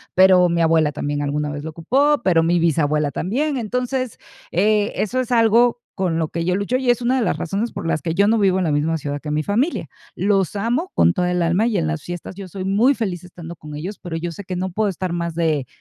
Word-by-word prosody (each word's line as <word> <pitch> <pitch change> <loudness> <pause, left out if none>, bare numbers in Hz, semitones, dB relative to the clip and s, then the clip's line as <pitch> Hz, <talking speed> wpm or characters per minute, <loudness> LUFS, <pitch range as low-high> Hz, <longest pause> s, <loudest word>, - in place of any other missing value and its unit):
pero 185 -1 +6
mi 170 0 +1
abuela 160 -2 +3
también 145 0 -2
alguna 145 +1 -1
vez 145 0 -6
lo 160 - -4
ocupó, 270 - +2
pero 170 -3 +4
mi 170 +1 +2
bisabuela 150 -2 +1
también. 270 - -1
Entonces, 250 +1 -2 0.3
e 210 +3 +2
eso 235 +5 -1
es 255 - -2
algo 235 +1 +4
con 180 -4 -1
lo 160 -2 -1
que 170 0 -3
yo 180 +1 +1
lucho 200 +5 -1
y 260 -1 -1
es 245 +1 +3
una 255 +2 +2
de - - +1
las - - 0
razones 200 +7 -2
por - - -6
las 155 - 0
que 165 +3 -2
yo 200 +2 +4
no 225 +1 +3
vivo 190 -2 +3
en - - 0
la 160 - +1
misma 155 +3 +1
ciudad 145 -1 -4
que 150 - -6
mi 155 +1 0
familia. 245 +12 -1 0.3
Los 195 -1 +1
amo 240 - -1
con 175 - +4
toda 180 -2 0
el 180 - 0
alma 180 +7 +2
y 225 -4 0
en 165 - 0
las 165 -1 -2
fiestas 175 0 -6
yo 195 0 -8
soy 185 +1 -6
muy 220 +8 +3
feliz 190 -8 -3
estando 170 -1 -10
con 150 -1 -10
ellos, 180 +8 -6
pero 170 -3 -5
yo 170 +1 -4
sé 200 +5 -8
que 185 -1 -4
no 185 +1 -2
puedo 210 +3 0
estar 185 -1 -3
más 170 -1 -3
de 155 -6 0
185 Hz, 255 wpm, -21 LUFS, 165-220 Hz, 0.3 s, pero